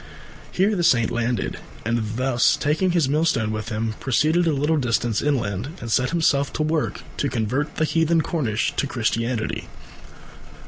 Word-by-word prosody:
Here 200 +3 +2
the 175 - 0
Saint 120 -8 +3
landed, 120 0 -1 0.3
and, 115 +1 0 0.6
taking 160 +6 +1
his 170 -5 +2
millstone 145 -7 +1
with 110 +1 -4
him, 110 0 -2
proceeded 155 +7 +2
a - - +3
little 150 +3 +1
distance 120 -4 0
inland 130 - -2
and 115 -1 -6
set 130 +3 +2
himself 145 -4 +1
to 155 - -1
work 155 0 -1 0.2
to 140 - 0
convert 130 +6 -2
the 155 - +1
heathen 165 +1 +2
Cornish 125 -10 -1
to 140 - +1
Christianity. 115 -1 -2
135 Hz, 150 wpm, -23 LUFS, 115-160 Hz, 0.6 s, Saint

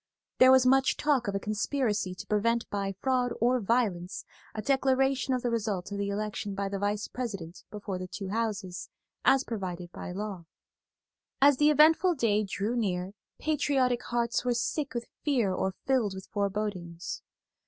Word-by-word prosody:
There 255 0 +8
was 260 -1 +6
much 265 +1 +4
talk 280 -6 +1
of 200 - -1
a - - +1
conspiracy 210 -2 -1
to - - -8
prevent 230 +3 +1
by 195 -1 -2
fraud 255 -2 +1
or 245 +2 +3
violence 200 -5 0 0.3
a - - -4
declaration 270 -1 +2
of 250 - -3
the 240 - 0
result 210 -5 -2
of 200 - -3
the 200 0 -1
election 205 -1 -3
by 200 0 -2
the 195 0 -3
Vice 205 +1 -1
President 195 -9 -6
before 205 -2 -5
the 185 - -5
two 195 +1 -6
Houses, 205 -4 -3 0.3
as 270 0 +5
provided 180 -7 -5
by - - -7
law. 195 -2 -5 0.9
As 280 -1 +6
the 295 +2 +5
eventful 320 +4 +5
day 215 -5 +2
drew 205 +3 -2
near 190 -4 -1 0.2
patriotic 270 -5 +1
hearts 235 0 0
were 245 -1 +1
sick 275 +3 -2
with 235 0 -2 0.2
fear 240 -10 +2
or 190 0 -1
filled 240 -8 +1
with 190 - -8
forebodings. 195 -4 -3
215 Hz, 165 wpm, -29 LUFS, 195-255 Hz, 0.9 s, There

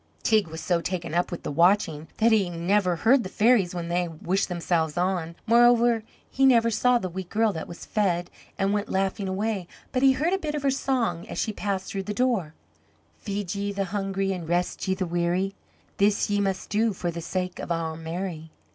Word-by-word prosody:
Teig 215 -5 +3
was 160 0 -7
so 175 -2 +1
taken 170 -3 -4
up 175 +1 +1
with 175 - -6
the - - -3
watching 165 -1 +2
that 230 +1 +4
he 205 -5 +3
never 180 +2 +1
heard 240 +10 +4
the 185 - -6
fairies 210 -4 +3
when 170 -1 -3
they 175 +1 0
wished 175 +5 -1
themselves 170 -3 -1
on; 175 -2 -1
moreover, 235 0 +5 0.3
he 270 - -1
never 230 -3 +5
saw 245 +3 +3
the 190 - -3
wee 185 +2 -5
girl 210 +4 0
that 160 - -5
was 170 - -9
fed, 175 -4 0 0.3
and 195 +1 +1
went 205 0 -1
laughing 195 +1 -1
away. 195 -1 -2 0.2
But 255 - 0
he 270 0 +6
heard 320 +7 0
a 385 - +1
bit 300 -4 -3
of 295 - -3
her 275 - +3
song 250 -10 -1
as - - -7
she 215 - -1
passed 195 -2 -3
through 195 - -2
the 210 +2 -5
door: 210 -11 0 0.6
"Feed 200 -3 -3
ye 200 0 -2
the 195 -1 -2
hungry 195 -1 -1
an' 175 -3 -6
rest 175 +3 -1
ye 190 - +1
the 190 0 -2
weary, 175 +3 0 0.4
This 205 +1 +2
ye 205 0 +2
must 195 -1 -2
do 220 +1 +2
for 175 -2 -3
the 170 0 -6
sake 180 +2 -3
of - - -5
Our 165 -1 -1
Mary." 165 0 -5
195 Hz, 210 wpm, -26 LUFS, 175-215 Hz, 0.6 s, he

